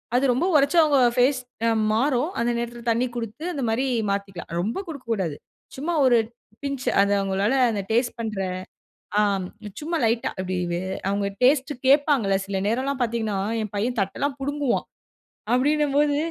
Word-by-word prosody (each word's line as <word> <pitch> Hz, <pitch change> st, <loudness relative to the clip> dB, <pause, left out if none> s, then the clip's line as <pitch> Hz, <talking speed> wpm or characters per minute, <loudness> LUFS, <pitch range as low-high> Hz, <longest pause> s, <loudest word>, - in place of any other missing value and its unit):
அது 250 Hz, -, +3 dB
ரொம்ப 255 Hz, +8 st, +1 dB
ஓரச்சா 290 Hz, +4 st, +4 dB
அவுங்க 290 Hz, -3 st, +3 dB, 0.2 s
ஃபேஸ் 255 Hz, +1 st, +3 dB, 0.5 s
மாறும், 255 Hz, +5 st, +1 dB
அந்த 235 Hz, +1 st, +1 dB
நேரத்ல 235 Hz, 0 st, -4 dB
தண்ணீ 240 Hz, +3 st, +1 dB
குடுத்து 230 Hz, +4 st, -5 dB
அந்த 275 Hz, -, -3 dB
மாரி 240 Hz, +5 st, +1 dB, 0.2 s
மாத்திக்கலாம். 195 Hz, -4 st, -4 dB
ரொம்ப 210 Hz, +6 st, -2 dB
குடுக்க 290 Hz, -6 st, -8 dB
கூடாது. 185 Hz, -9 st, -1 dB, 0.4 s
சும்மா 305 Hz, +6 st, -2 dB
ஒரு 245 Hz, -2 st, +5 dB, 0.5 s
பின்ச்சு 275 Hz, -3 st, -2 dB
அது 200 Hz, 0 st, +2 dB
அவங்களால 195 Hz, +4 st, +1 dB, 0.2 s
அந்த 205 Hz, -, -2 dB
டேஸ்ட் 240 Hz, +2 st, +1 dB
பண்ற 220 Hz, -3 st, -3 dB, 0.8 s
அம் 195 Hz, -3 st, +1 dB, 0.3 s
சும்மா 330 Hz, +3 st, -2 dB
லைட்டா. 230 Hz, +1 st, +1 dB
அப்டி 185 Hz, 0 st, -3 dB, 0.5 s
அவுங்க 200 Hz, 0 st, 0 dB, 0.2 s
டேஸ்ட்டுக் 270 Hz, 0 st, +2 dB
கேப்பாங்கல்ல, 275 Hz, -8 st, +4 dB
சில 195 Hz, -1 st, -2 dB
நேரம்லாம் 260 Hz, +4 st, -1 dB
பாத்தீங்கன்னா, 225 Hz, -4 st, -1 dB, 0.2 s
என் 215 Hz, -2 st, -4 dB
பையன் 230 Hz, +5 st, -1 dB
தட்டலாம் 270 Hz, +9 st, -2 dB
புடுங்குவான்! 285 Hz, -1 st, -1 dB, 0.7 s
அப்படின்னம்போது 290 Hz, +2 st, +2 dB
245 Hz, 145 wpm, -24 LUFS, 210-280 Hz, 0.8 s, ஒரு